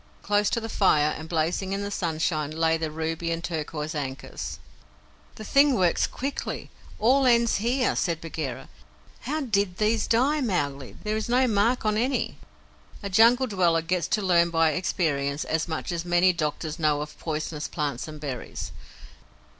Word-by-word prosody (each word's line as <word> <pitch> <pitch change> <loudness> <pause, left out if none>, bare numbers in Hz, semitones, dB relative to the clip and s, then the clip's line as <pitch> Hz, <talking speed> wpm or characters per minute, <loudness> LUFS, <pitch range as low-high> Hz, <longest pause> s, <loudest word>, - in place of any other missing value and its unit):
Close 205 0 +2
to - - 0
the 225 - -5
fire, 155 -8 +3
and 160 +1 -8
blazing 175 +4 0
in 200 +1 -2
the 200 - -4
sunshine, 160 -4 -1
lay 160 +1 +1
the 160 -1 -2
ruby 160 +2 -3
and 165 0 -2
turquoise 155 -2 -3
ankus. 135 -3 -5 0.8
"The 215 - -8
thing 280 +4 +4
works 180 -5 +2
quickly; 275 +2 -5 0.3
all 260 +4 +4
ends 235 -1 +4
here," 245 +5 +1
said 170 -3 0
Bagheera. 155 -6 -5 0.5
"How 305 +5 -3
did 200 -8 0
THESE 215 +1 +1
die, 275 +6 +2
Mowgli? 145 - -2
There 215 0 -1
is 220 - -3
no 255 +2 +4
mark 225 +1 +1
on 215 0 +2
any." 255 +4 -1 0.6
A 200 - -4
Jungle 235 +6 +5
dweller 175 -7 +2
gets 175 +1 0
to 210 - 0
learn 170 -2 +4
by 165 -1 +3
experience 150 -5 -1
as 160 +1 -1
much 160 +1 -3
as 170 -1 -2
many 175 +1 +3
doctors 155 0 -3
know 150 -2 +2
of 150 0 -8
poisonous 155 -1 -3
plants 145 -4 -3
and 155 -1 -8
berries. 140 -4 -5
175 Hz, 165 wpm, -26 LUFS, 155-215 Hz, 0.8 s, Jungle